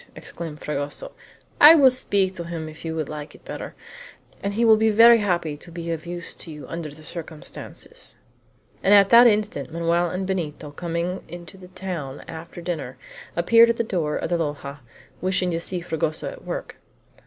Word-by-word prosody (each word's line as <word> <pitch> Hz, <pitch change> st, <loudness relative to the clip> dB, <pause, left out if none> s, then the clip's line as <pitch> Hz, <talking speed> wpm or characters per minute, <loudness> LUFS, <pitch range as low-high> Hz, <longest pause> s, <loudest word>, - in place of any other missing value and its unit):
exclaimed 160 Hz, -3 st, -7 dB
Fragoso; 145 Hz, -1 st, -3 dB, 0.5 s
"I 305 Hz, +3 st, +11 dB
will 270 Hz, -5 st, +7 dB
speak 200 Hz, -7 st, 0 dB
to 170 Hz, -2 st, -6 dB
him 165 Hz, -2 st, -5 dB
if 155 Hz, 0 st, -11 dB
you 160 Hz, -1 st, -3 dB
would 155 Hz, -3 st, -2 dB
like 150 Hz, 0 st, -7 dB
it -, -, -19 dB
better, -, -, -7 dB, 0.7 s
and 200 Hz, 0 st, -3 dB
he 235 Hz, +2 st, +2 dB
will 220 Hz, -1 st, +8 dB
be 220 Hz, +1 st, +3 dB
very 230 Hz, +2 st, +7 dB
happy 175 Hz, -7 st, 0 dB
to 170 Hz, -, -13 dB
be 170 Hz, 0 st, -5 dB
of 165 Hz, 0 st, -5 dB
use 175 Hz, -1 st, -4 dB
to -, -, -8 dB
you 150 Hz, -2 st, -9 dB
under 165 Hz, -2 st, -5 dB
the 150 Hz, +2 st, -13 dB
circumstances." 170 Hz, -, -7 dB, 0.6 s
And 205 Hz, -, +6 dB
at 200 Hz, -1 st, +6 dB
that 240 Hz, +1 st, +9 dB
instant 210 Hz, -, 0 dB
Manoel 170 Hz, +1 st, +1 dB
and 185 Hz, +3 st, -3 dB
Benito, 155 Hz, -6 st, -3 dB
coming 170 Hz, +3 st, -3 dB
into 175 Hz, +1 st, -10 dB
the 185 Hz, -1 st, -13 dB
town 175 Hz, -7 st, -6 dB
after 165 Hz, +2 st, -9 dB
dinner, 170 Hz, -2 st, -4 dB, 0.4 s
appeared 230 Hz, 0 st, +6 dB
at 230 Hz, -, +1 dB
the -, -, +1 dB
door 170 Hz, -8 st, -1 dB
of -, -, -3 dB
the 175 Hz, -, +2 dB
loja, 145 Hz, -2 st, -4 dB, 0.4 s
wishing 185 Hz, -1 st, +1 dB
to 165 Hz, 0 st, -2 dB
see 180 Hz, 0 st, -3 dB
Fragoso 160 Hz, -2 st, -2 dB
at -, -, -12 dB
work. -, -, -6 dB
170 Hz, 190 wpm, -24 LUFS, 155-195 Hz, 0.7 s, I